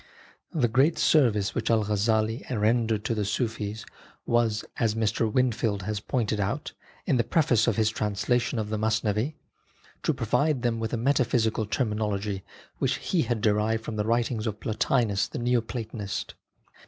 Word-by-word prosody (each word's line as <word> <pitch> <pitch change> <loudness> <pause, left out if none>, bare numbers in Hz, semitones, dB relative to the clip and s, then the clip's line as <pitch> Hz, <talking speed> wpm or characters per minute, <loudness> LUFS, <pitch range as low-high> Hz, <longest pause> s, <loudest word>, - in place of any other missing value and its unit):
The 145 -9 +2
great 135 +8 +3
service 110 -10 +3
which 115 -2 -2
Al 110 -2 +3
Ghazzali 110 +2 +1
rendered 110 -2 +1
to - - +1
the 105 -2 -1
Sufis 105 0 -2 0.4
was, 115 -2 +1
as 110 -3 +1
Mr. 110 0 0
Whinfield 115 -5 +1
has 105 +1 -2
pointed 110 -2 -1
out, 105 +9 -2 0.3
in 135 - +2
the 120 - +3
preface 120 -3 +2
to 115 - +2
his 110 +1 +2
translation 115 +4 0
of 110 -1 -3
the 110 - -1
Masnavi, 110 +5 0 0.7
to - - +1
provide 145 -4 0
them 115 -2 0
with 110 0 -2
a 120 - -1
metaphysical 115 -4 +1
terminology 105 -3 -1 0.4
which - - +1
he 175 - 0
had 120 -7 -1
derived 110 +1 +1
from 110 - -4
the 105 - +1
writings 115 0 0
of 105 -1 -3
Plotinus 110 -2 +1
the - - -7
Neo 120 0 +2
Platonist. 110 -3 -5
110 Hz, 160 wpm, -27 LUFS, 105-120 Hz, 0.7 s, great